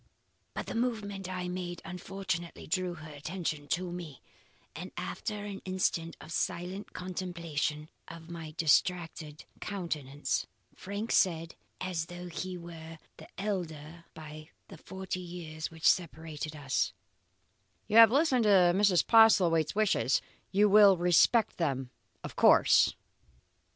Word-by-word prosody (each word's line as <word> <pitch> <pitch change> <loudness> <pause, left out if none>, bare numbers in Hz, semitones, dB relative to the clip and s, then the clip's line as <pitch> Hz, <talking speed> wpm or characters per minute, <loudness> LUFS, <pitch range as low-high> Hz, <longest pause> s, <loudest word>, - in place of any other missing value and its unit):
"But - - -4
the - - -6
movement 210 -5 -2
I 180 -1 -4
made 180 -1 -5
unfortunately 180 -1 -5
drew 180 +1 -1
their 155 -2 -10
attention 155 -1 -4
to 175 +2 -2
me, 170 -6 -7 0.6
and - - -7
after 210 -1 -4
an 200 -1 -7
instant 185 -3 -1
of 160 - -11
silent 180 +4 -3
contemplation 170 -5 -3 0.2
of 165 0 -11
my 165 -3 -8
distracted 160 -1 0
countenance, 150 -8 -3 0.3
Frank 205 +4 -5
said, 165 -3 +2 0.3
as 175 -3 -3
though 175 0 -8
he 185 +2 -5
were 165 -1 -10 0.2
the - - -12
elder 170 -5 -4
by 155 0 -10 0.2
the - - -11
forty 190 0 -6
years 170 -3 -6
which 160 -1 -9
separated 160 -3 -1
us: 140 -7 -1 0.9
"'You 215 - +2
have 230 -1 +10
listened 265 -2 +3
to 185 -4 +5
Mrs. 195 -2 +3
Postlethwaite's 185 -9 +5
wishes. 215 -1 +2 0.3
You 205 +2 +4
will 205 -2 +7
respect 180 +6 +3
them 135 -6 -2 0.3
of - - -7
course. - - +5
175 Hz, 125 wpm, -30 LUFS, 160-190 Hz, 0.9 s, have